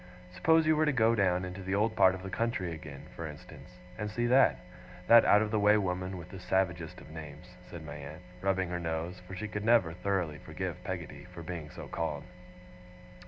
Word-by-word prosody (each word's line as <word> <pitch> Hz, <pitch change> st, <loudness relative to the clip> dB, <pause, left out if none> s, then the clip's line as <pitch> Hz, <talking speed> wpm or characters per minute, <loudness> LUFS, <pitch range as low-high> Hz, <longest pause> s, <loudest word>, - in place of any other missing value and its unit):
Suppose 160 Hz, -, +4 dB
you 155 Hz, 0 st, +4 dB
were 155 Hz, 0 st, +2 dB
to -, -, +4 dB
go 115 Hz, -3 st, +4 dB
down 90 Hz, -4 st, +2 dB
into 90 Hz, +1 st, -7 dB
the 95 Hz, +1 st, -1 dB
old 110 Hz, +2 st, +1 dB
part 95 Hz, 0 st, +5 dB
of 95 Hz, -, -9 dB
the 95 Hz, -, -6 dB
country 115 Hz, -7 st, -1 dB
again, 75 Hz, -4 st, -9 dB
for 85 Hz, -, -5 dB
instance, 75 Hz, 0 st, -11 dB, 0.3 s
and 105 Hz, -1 st, -2 dB
see 120 Hz, +3 st, -1 dB
that 130 Hz, +3 st, +5 dB, 0.5 s
that 115 Hz, +2 st, +8 dB
out 105 Hz, +1 st, +6 dB
of 105 Hz, -, -3 dB
the 110 Hz, -, +2 dB
way 105 Hz, +1 st, +5 dB
woman 90 Hz, -1 st, -2 dB
with 90 Hz, 0 st, -9 dB
the 95 Hz, -, -9 dB
savagest 90 Hz, -3 st, -1 dB
of 75 Hz, -, -13 dB
names,' 80 Hz, +3 st, -10 dB
said 85 Hz, -3 st, -8 dB
my 75 Hz, 0 st, -7 dB
aunt, 75 Hz, +4 st, -9 dB, 0.2 s
rubbing 95 Hz, -2 st, +1 dB
her 90 Hz, 0 st, -2 dB
nose, 85 Hz, +2 st, -3 dB
for 95 Hz, -, -7 dB
she 110 Hz, +4 st, -4 dB
could 105 Hz, -1 st, -4 dB
never 110 Hz, -8 st, +4 dB
thoroughly 90 Hz, -4 st, -1 dB
forgive -, -, -5 dB
Peggotty -, -, -6 dB
for 90 Hz, -2 st, -10 dB
being 80 Hz, -3 st, -6 dB
so -, -, -9 dB
called. 75 Hz, -3 st, -3 dB
90 Hz, 210 wpm, -31 LUFS, 85-105 Hz, 0.5 s, that